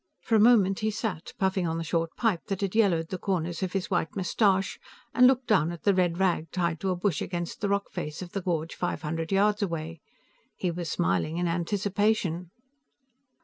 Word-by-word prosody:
For - - -3
a 220 - +6
moment 205 -4 +5
he 215 - 0
sat, 205 -6 -4
puffing 190 -2 +1
on 165 0 -1
the 165 - -2
short 165 0 0
pipe 220 -8 0
that 195 -1 -3
had 195 -2 -1
yellowed 180 -7 +2
the 185 - -4
corners 175 -4 -2
of 185 -1 -2
his 195 0 -2
white 170 -3 0
mustache, 195 0 +1 0.3
and 250 +2 +7
looked 260 -1 +2
down 175 -8 +3
at 170 - -9
the 200 - +4
red 175 -2 +1
rag 175 -4 +1
tied 170 -3 -1
to 190 - -2
a 185 - +1
bush 180 -2 -1
against 175 -2 -4
the 205 - 0
rock 200 0 -1
face 160 -1 -5
of 175 - -10
the 195 - -3
gorge 165 -3 -2
five 155 - -3
hundred 165 +2 -3
yards 205 +2 +3
away. 165 -4 -3 0.5
He 180 - -1
was 170 -1 -4
smiling 155 - 0
in 175 0 0
anticipation. 185 0 0
180 Hz, 205 wpm, -27 LUFS, 165-200 Hz, 0.5 s, and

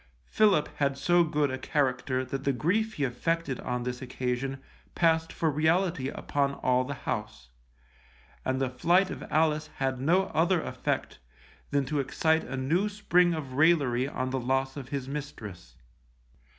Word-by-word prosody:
Philip 205 -8 +3
had 140 -1 +1
so 175 +4 +4
good 150 -3 0
a 130 - -4
character 130 -2 0
that 135 +2 -4
the 140 - +1
grief 210 - 0
he 145 - -2
affected 135 +3 -1
on 125 0 -3
this 125 0 -4
occasion 130 +1 -3 0.4
passed 165 -1 +2
for 160 -2 0
reality 160 0 +1
upon 140 -1 -1
all 125 0 +2
the 140 +2 -5
house, 105 - -5 0.9
and 130 0 -1
the 135 - +1
flight 175 +8 +3
of - - -6
Alice 155 0 +2
had 130 -1 -1
no 180 +7 +2
other 170 +3 +3
effect - - -3 0.5
than 140 -1 +1
to 150 +2 -1
excite 160 +4 +1
a 135 +2 -5
new 165 +11 +1
spring 180 -4 +2
of 145 -5 -6
railery 140 -4 +3
on 130 -2 -3
the 130 - -1
loss 135 +2 0
of 135 -3 -7
his 140 -2 -3
mistress. 110 - -7
140 Hz, 160 wpm, -28 LUFS, 130-165 Hz, 0.9 s, so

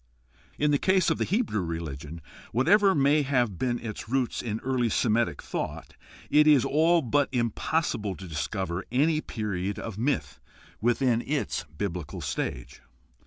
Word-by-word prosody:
In 150 0 +2
the 145 - +3
case 190 -2 +3
of - - -1
the - - +1
Hebrew 195 - 0
religion, 80 -2 -5 0.3
whatever 195 - +4
may 145 +1 +4
have 125 -9 0
been 120 -2 0
its 110 -2 -7
roots 130 -1 0
in 110 -2 -3
early 125 -3 0
Semitic 110 - +1
thought, - - -5 0.4
it 150 +1 +6
is 145 -5 +6
all 165 +2 +3
but 140 +3 +1
impossible 115 - -1
to 95 - -9
discover 85 +3 -3
any 155 +5 +2
period 100 -5 -3
of 110 -2 -6
myth 135 +3 -1 0.4
within 120 0 +2
its 140 - -2
biblical 90 -6 -4
stage. 60 - -4
120 Hz, 145 wpm, -27 LUFS, 100-145 Hz, 0.4 s, it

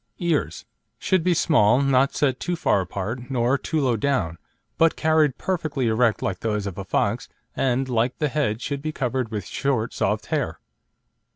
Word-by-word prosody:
EARS 170 -4 -1 0.3
Should 185 -3 +1
be 180 0 +2
small, 125 - +4
not 135 -1 +2
set 130 -3 +1
too 175 - -2
far 130 - +2
apart, 100 +7 -5
nor 125 0 +2
too 155 +3 -2
low 130 -5 +2
down, 105 -9 -1 0.4
but 165 0 +4
carried 155 -3 +2
perfectly 155 -8 -2
erect 115 0 +2
like 95 -2 -2
those 105 -2 -1
of 100 -3 -5
a - - -3
fox, - - -1 0.3
and, 130 0 +1
like 120 0 0
the 150 - +1
head, 130 -7 -1
should 140 -1 -3
be 155 +1 -3
covered 130 -4 -2
with 105 -4 -4
short, 125 -2 -1
soft - - -1
hair. - - -1
130 Hz, 175 wpm, -24 LUFS, 115-150 Hz, 0.4 s, small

